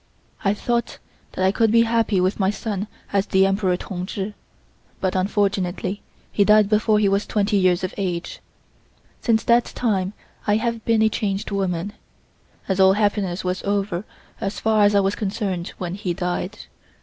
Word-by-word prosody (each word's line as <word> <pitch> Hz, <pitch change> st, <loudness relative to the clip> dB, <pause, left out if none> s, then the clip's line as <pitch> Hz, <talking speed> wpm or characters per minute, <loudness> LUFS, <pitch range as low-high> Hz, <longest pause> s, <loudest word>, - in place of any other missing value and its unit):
"I 200 Hz, 0 st, +2 dB
thought 235 Hz, +2 st, -1 dB, 0.4 s
that 185 Hz, -, 0 dB
I 190 Hz, -, +4 dB
could 225 Hz, +1 st, +2 dB
be 230 Hz, 0 st, +6 dB
happy 225 Hz, -3 st, +1 dB
with 185 Hz, +3 st, +1 dB
my 190 Hz, -1 st, +3 dB
son 210 Hz, -1 st, -3 dB, 0.3 s
as 200 Hz, 0 st, +2 dB
the 190 Hz, 0 st, +4 dB
Emperor 195 Hz, -2 st, +1 dB
Tung 180 Hz, 0 st, -5 dB
Chi, 200 Hz, +1 st, -4 dB, 0.7 s
but 185 Hz, -1 st, -1 dB
unfortunately 195 Hz, 0 st, 0 dB, 0.3 s
he 205 Hz, -, +3 dB
died 210 Hz, 0 st, +5 dB
before 215 Hz, 0 st, +3 dB
he 210 Hz, -1 st, +3 dB
was 200 Hz, +1 st, +1 dB
twenty 210 Hz, 0 st, +1 dB
years 185 Hz, -2 st, +3 dB
of 185 Hz, -, -2 dB
age. 180 Hz, -4 st, -3 dB, 0.8 s
Since 225 Hz, -2 st, +2 dB
that 235 Hz, 0 st, +4 dB
time 200 Hz, -5 st, -1 dB, 0.3 s
I 205 Hz, -, +4 dB
have 230 Hz, 0 st, -1 dB
been 225 Hz, -1 st, +3 dB
a 220 Hz, -, +4 dB
changed 205 Hz, -1 st, -2 dB
woman, 195 Hz, -1 st, -2 dB, 0.7 s
as 190 Hz, -1 st, -1 dB
all 190 Hz, 0 st, +7 dB
happiness 200 Hz, -3 st, 0 dB
was 185 Hz, 0 st, -2 dB
over 200 Hz, -2 st, -1 dB, 0.4 s
as 195 Hz, 0 st, -3 dB
far 220 Hz, -2 st, +3 dB
as 205 Hz, 0 st, +3 dB
I 200 Hz, -, +5 dB
was 195 Hz, +1 st, +1 dB
concerned 195 Hz, -4 st, -3 dB
when 180 Hz, -1 st, -4 dB
he 190 Hz, -3 st, -3 dB
died. 180 Hz, +3 st, -3 dB
200 Hz, 175 wpm, -22 LUFS, 185-215 Hz, 0.8 s, all